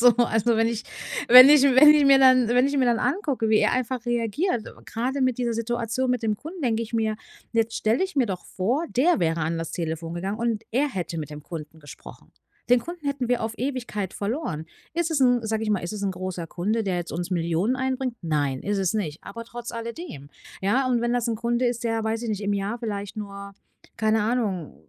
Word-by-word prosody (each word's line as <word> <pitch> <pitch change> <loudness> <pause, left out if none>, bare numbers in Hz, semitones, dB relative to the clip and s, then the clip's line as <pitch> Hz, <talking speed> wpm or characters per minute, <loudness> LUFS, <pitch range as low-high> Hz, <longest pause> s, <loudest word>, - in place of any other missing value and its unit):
So, 245 - +8
also, 235 -1 +2
wenn 225 0 +3
ich 230 -1 -3 0.5
wenn 255 +3 +11
ich 295 -2 +7
wenn 275 +2 +7
ich 295 - +4
mir 275 0 +7
dann 255 -3 +5
wenn 250 +2 +3
ich 285 +1 -1
mir 260 - +3
dann 235 -2 +2
angucke, 265 - -1
wie 215 - +5
er - - +2
einfach 255 -1 -2
reagiert. 240 - -1
Äh, - - -8 0.2
gerade 255 +4 -2
mit 255 -2 +1
dieser 240 -1 0
Situation 240 +2 -1
mit 250 -2 -1
dem 215 -1 +1
Kunden 325 - -9
denke 230 -2 0
ich 230 - -9
mir 220 -1 +1 0.4
jetzt 230 0 0
stelle 225 +9 +1
ich 380 -4 -8
mir 260 -3 +3
doch 190 -4 -5
vor 250 - -1
der 285 - +2
wäre 165 0 0
an 165 +2 -1
das 165 - -4
Telefon 165 -1 -4
gegangen 195 +5 -4
und 230 -2 -1
er 280 +4 +2
hätte 180 -8 -4
mit 150 -2 -6
dem 150 0 -9
Kunden 160 -1 -8
gesprochen. 145 -2 -13 0.4
Den 245 - +6
Kunden 340 +1 -8
hätten 275 -3 -2
wir 245 -1 +1
auf 225 0 -3
Ewigkeit 240 -7 -3
verloren. 205 - -3 0.3
Ist 340 -1 0
es 285 - 0
'n, 245 -2 +4
sage 220 0 -1
ich 215 - -1
mal, 205 - +2
ist 175 - -5
es 210 -1 -5
'n 195 - 0
großer 180 -2 -5
Kunde, 215 +6 -1
der 185 -2 -1
jetzt 175 -1 -4
uns 175 +2 -4
Millionen 175 +7 0
einbringt? 260 -2 -2
Nein, 145 -5 -1
ist 205 0 -1
es 190 +1 0
nicht. 160 -8 -3
Aber 230 0 -8
trotz 235 0 -8
alledem. 230 - -7 0.3
Ja? 255 +7 +2
Und 245 -2 +1
wenn 240 0 0
das 245 -1 0
'n 225 - -1
Kunde 235 +2 0
ist, 240 0 -2
der 225 -1 0
weiß 225 +1 -2
ich 230 - -3
nicht 210 -1 -3
im 205 0 0
Jahr 200 +4 -3
vielleicht 205 -3 -5
nur 200 -1 -7 0.4
keine 220 0 +2
Ahnung, 210 -8 -1
230 Hz, 230 wpm, -24 LUFS, 200-250 Hz, 0.5 s, wenn